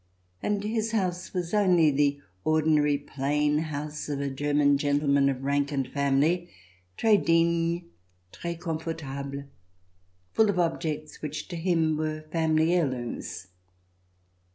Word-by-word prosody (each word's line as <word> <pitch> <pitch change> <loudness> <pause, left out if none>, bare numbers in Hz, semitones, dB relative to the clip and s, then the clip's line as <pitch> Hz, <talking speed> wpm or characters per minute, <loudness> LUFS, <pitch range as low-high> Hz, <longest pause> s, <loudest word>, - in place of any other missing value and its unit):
And 205 -1 -1
his 220 +1 -1
house 185 -4 -1
was 180 -1 -3
only 180 -7 +4
the 140 0 +2 0.2
ordinary 155 -2 +3
plain 145 +1 0
house 150 -1 -4
of 145 -1 -2
a 140 -1 -2
German 145 0 +2
gentle 145 0 +1
man 140 0 +4
of 135 -1 -3
rank 140 +1 +1
and 135 -2 -1
family 145 +5 +1 0.2
— 90 0 -36
tres 215 -3 +4
digne, 170 0 +2 0.5
tres 170 -1 -5
comfortable, 155 -5 -4 0.9
full 220 -1 +4
of 200 - 0
objects 160 -3 -2
which 155 0 -5
to 175 - -5
him 165 -2 +1
were 155 0 -3
family 160 0 +2
heirlooms. 130 - -2
155 Hz, 130 wpm, -27 LUFS, 140-170 Hz, 0.9 s, only